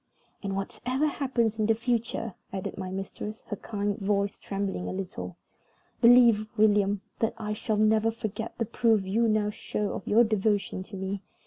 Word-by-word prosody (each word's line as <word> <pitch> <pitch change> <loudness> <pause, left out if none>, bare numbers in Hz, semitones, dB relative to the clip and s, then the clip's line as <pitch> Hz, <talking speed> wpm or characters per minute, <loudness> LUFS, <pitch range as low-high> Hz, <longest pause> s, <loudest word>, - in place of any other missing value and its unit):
"And, 195 -1 -3
whatever 255 +8 -1
happens 245 -7 0
in 215 - +2
the 225 - +4
future," 230 -2 -1 0.2
added 190 -1 -4
my 185 - -5
mistress, 195 +3 -6
her 205 - -2
kind 205 0 -3
voice 200 0 0
trembling 195 -2 -3
a - - -3
little, 185 0 -5 0.6
"believe, 235 -3 +7
William, 205 -2 +3 0.2
that 225 - 0
I 210 -2 -3
shall 215 0 -1
never 215 +1 +4
forget 220 -1 -5
the 230 - 0
proof 220 -3 +2
you 225 +5 +2
now 215 -1 +2
show 210 -1 -3
of - - -6
your 230 +3 +6
devotion 210 -3 0
to 195 +1 -8
me. 190 +1 -3
210 Hz, 165 wpm, -28 LUFS, 200-225 Hz, 0.6 s, believe